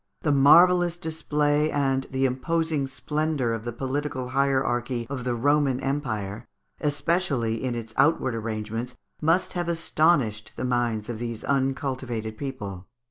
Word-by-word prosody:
The 150 - +1
marvellous 175 +5 +6
display 150 -3 0
and 135 -2 0
the 135 0 0
imposing 150 +3 0
splendour 150 -2 -1
of 115 0 -5
the 120 - -2
political 130 +1 -3
hierarchy 130 -3 0
of 130 -3 -4
the 125 -1 0
Roman 140 +1 +2
Empire, 120 -7 -3 0.3
especially 145 -7 0
in 125 -2 -1
its 115 -1 -6
outward 140 -5 +3
arrangements, 115 +1 -4 0.3
must 165 +4 +2
have 175 -1 -2
astonished 150 -10 +1
the - - -3
minds 120 -4 0
of 120 -2 -5
these 115 -2 -5
uncultivated 130 -5 -1
people. 105 -8 -6
135 Hz, 135 wpm, -26 LUFS, 120-150 Hz, 0.3 s, marvellous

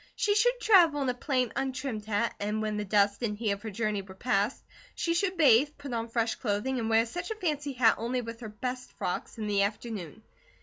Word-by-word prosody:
She 410 - +2
should 485 +4 +3
travel 335 -11 +5
in 265 - 0
a - - +1
plain 255 -2 -1
untrimmed 260 -5 -3
hat, 215 +2 0
and 210 +1 -1
when 215 -1 -2
the 210 - -1
dust 200 +1 +2
and 210 -3 -2
heat 215 -2 0
of 200 0 -3
her 220 - -5
journey 215 -1 -1
were 190 -1 -12
past, 205 +1 0 0.3
she 335 - 0
should 370 +2 0
bathe, 280 -2 +6
put 280 -3 -7
on 230 0 -2
fresh 230 0 0
clothing, 240 +4 -1
and 225 -1 -2
wear 225 0 +4
such 350 +9 -5
a 440 - -3
fancy 300 -8 -2
hat 235 -3 +4
only 245 +3 -1
with 230 -1 -7
her 225 -3 -7
best 250 +4 -5
frocks, 180 - -4
in 220 - -3
the 205 -1 +1
afternoon. 210 -2 -4
230 Hz, 225 wpm, -29 LUFS, 210-270 Hz, 0.3 s, bathe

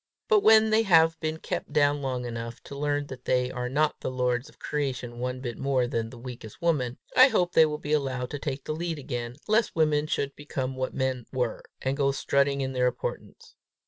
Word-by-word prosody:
But 435 -2 +5
when 220 - +6
they 220 +1 +5
have 165 -5 +4
been 155 +1 -2
kept - - -4
down 145 -1 +3
long 130 -2 -2
enough 115 0 -5
to 140 - -9
learn 145 0 -1
that 130 -2 -10
they 125 0 +1
are 125 -1 -3
not 150 +3 +1
the - - -3
lords 125 +1 -1
of - - -21
creation 125 -5 -3
one 125 +1 -3
bit 120 -3 -5
more 135 -2 +1
than 115 -2 -2
the 120 - -11
weakest 120 -3 -9
woman, 145 -8 0 0.2
I 255 - +9
hope 180 -9 +1
they 160 - +6
will 150 0 -3
be 150 0 -3
allowed 130 -4 -1
to 145 - -4
take 140 -2 -4
the - - -3
lead 165 0 -3
again, 120 -3 -5
lest 220 +2 +2
women 155 -2 +2
should 140 -2 -2
become 135 -3 -4
what 130 0 -3
men 130 -3 -1
were, 125 -4 -1 0.2
and 130 +1 0
go 140 -1 +2
strutting 140 0 +1
in 135 0 -2
their 125 -1 +2
importance. 125 0 -5
135 Hz, 215 wpm, -27 LUFS, 125-150 Hz, 0.2 s, I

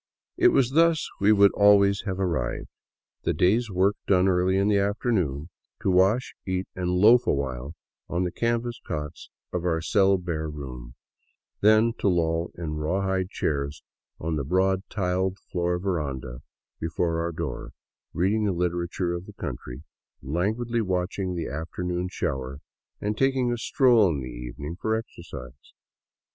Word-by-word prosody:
It 365 0 +5
was 130 - +3
thus 165 +1 +3
we 100 +2 +4
would 100 -1 +6
always 100 -1 +4
have 95 -1 -2
arrived; 80 -10 -2 0.5
the - - -1
day's 110 +6 +2
work 95 +2 +2
done 95 -1 +4
early 95 0 +2
in 100 +1 +2
the 105 -1 +3
afternoon, 95 - 0 0.3
to 95 - +2
wash, 95 +8 +3
eat, 95 0 -2
and 90 -1 -2
loaf 110 +7 +5
awhile 70 +2 -2 0.3
on 85 +1 0
the 90 - -1
canvas 120 +2 -1
cots 75 -1 -6 0.2
in 90 - -2
our 85 -2 +1
cell 95 +3 +3
bare 80 -4 -3
room; 65 -5 -8 0.6
then 110 +2 +5
to - - +1
loll 85 -2 +1
in 85 -3 -4
the - - -3
rawhide 95 +4 -1
chairs 70 -4 -2 0.4
on 80 0 -2
the 70 - -1
broad 95 +5 +2
tile 95 -1 0 0.2
floored 90 0 -1
veranda 70 -9 -3 0.4
before 80 +1 -1
our 85 0 -2
door, 80 -6 -5 0.4
reading 105 +5 +1
the 100 - +1
literature 85 0 -1
of 85 +1 -6
the - - -10
country, - - -7 0.4
languidly 110 - -1
watching 95 -1 -2
the 85 - -3
afternoon 90 +4 -3
shower, 65 -5 -3 0.4
and 105 +1 -2
taking 130 -2 +2
a 120 - -1
stroll 120 -6 +4
in 75 -5 -2
the 65 - -6
evening - - -7
for 110 +5 -1
exercise. 80 - -9
90 Hz, 155 wpm, -26 LUFS, 80-100 Hz, 0.6 s, would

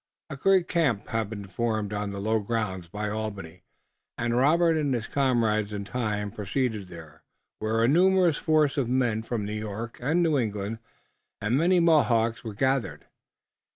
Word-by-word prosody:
A - - -4
great 185 +5 +3
camp 145 - 0
had 115 -2 -1
been 105 -2 -7
formed 110 0 -2
on 105 0 -2
the 100 0 -5
low 110 +2 +1
grounds 100 -5 -3
by 105 +4 -4
Albany, 100 -5 -5 0.6
and 120 0 -1
Robert 165 +6 +4
and 145 -4 0
his 115 -2 -3
comrades 115 -7 +1
in 100 -1 -4
time 105 -3 -2
proceeded 110 -1 -2
there, 80 -4 -12 0.4
where 110 +1 0
a - - +4
numerous 180 +1 +4
force 155 -3 +2
of 130 -4 0
men 120 -4 +1
from 115 -2 -3
New 105 - -4
York 110 +2 -5
and 160 +8 +2
New 155 -4 +2
England 105 -1 -3 0.6
and 105 +4 0
many 175 +5 +3
Mohawks 120 -8 +3
were 110 -3 -6
gathered. 130 +2 -1
115 Hz, 165 wpm, -26 LUFS, 105-135 Hz, 0.6 s, Robert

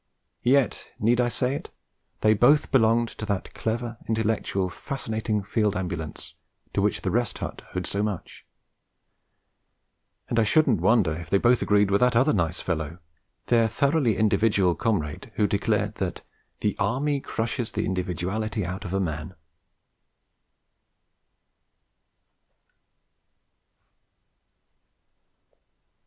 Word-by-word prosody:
Yet, 130 -2 +2
need 120 +3 +3
I 120 - +1
say 125 +2 -1
it? - - -6 0.5
they 110 0 +5
both 130 +8 +4
belonged 115 -2 +3
to 110 - -7
that 100 -3 -3
clever, 115 0 -3
intellectual, 110 -3 0
fascinating 110 -1 -3
Field 105 0 0
Ambulance 90 -4 -5 0.4
to - - +1
which - - 0
the - - 0
Rest - - 0
Hut - - -6
owed 90 -1 -2
so 100 - -2
much; 105 -4 -4 1.8
and 115 - +1
I - - +5
shouldn't 155 +9 +3
wonder 105 -9 +3
if 80 0 -8
they 100 - +4
both 120 +4 +3
agreed 105 -1 +3
with 100 - +3
that 125 -1 +4
other 130 +6 +4
nice 90 -3 0
fellow, 80 -2 -3 0.5
their 115 -2 +3
thoroughly 140 -3 +1
individual 105 -3 +3
comrade 105 - -2
who 105 - +2
declared 100 -1 0
that - - -3 0.4
'the 105 - 0
Army 135 +8 0
crushes 115 -1 -3
the - - -1
individuality 95 +4 -2
out 90 +2 -5
of 90 +1 -3
a - - +1
man!' 80 0 -3
110 Hz, 120 wpm, -25 LUFS, 95-120 Hz, 1.8 s, they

